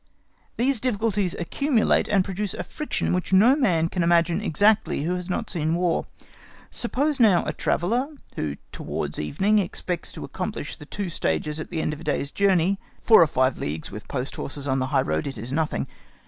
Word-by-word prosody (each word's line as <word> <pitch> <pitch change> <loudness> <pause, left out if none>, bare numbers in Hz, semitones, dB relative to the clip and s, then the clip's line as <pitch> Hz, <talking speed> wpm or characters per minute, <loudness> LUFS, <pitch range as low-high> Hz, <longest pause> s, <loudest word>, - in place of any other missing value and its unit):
These 255 +1 +2
difficulties 210 -5 0
accumulate 245 - +1
and 195 -3 +2
produce 195 +1 -3
a - - -4
friction 300 - -2
which 180 +1 -1
no 215 +8 +6
man 180 - +2
can 180 +1 -2
imagine 170 +2 +3
exactly 205 -3 +2
who 175 +3 0
has 180 0 -4
not 220 +5 -2
seen 160 -2 -1
War, 175 -1 0 0.6
Suppose 280 +4 0
now 205 -7 +5
a - - -2
traveller, 235 +10 0 0.3
who 75 -2 -2 0.2
towards - - -4
evening 195 - +2
expects 180 -2 -3
to - - -6
accomplish - - -4
the 150 - -12
two 200 +1 -4
stages 150 - -1
at 155 - -6
the 165 -3 -2
end 150 - -1
of 150 - -8
his 165 - -10
day's 145 -1 -1
journey, 195 -1 +2 0.2
four 220 - +7
or 165 - +6
five 130 -2 +1
leagues, 75 +2 -4
with 105 +2 -8
post 130 0 -4
horses, 140 0 -5
on 135 0 +1
the 130 - 0
high - - +2
road—it 80 - -2
is 115 +4 -5
nothing. 155 +2 0
175 Hz, 190 wpm, -25 LUFS, 150-210 Hz, 0.6 s, four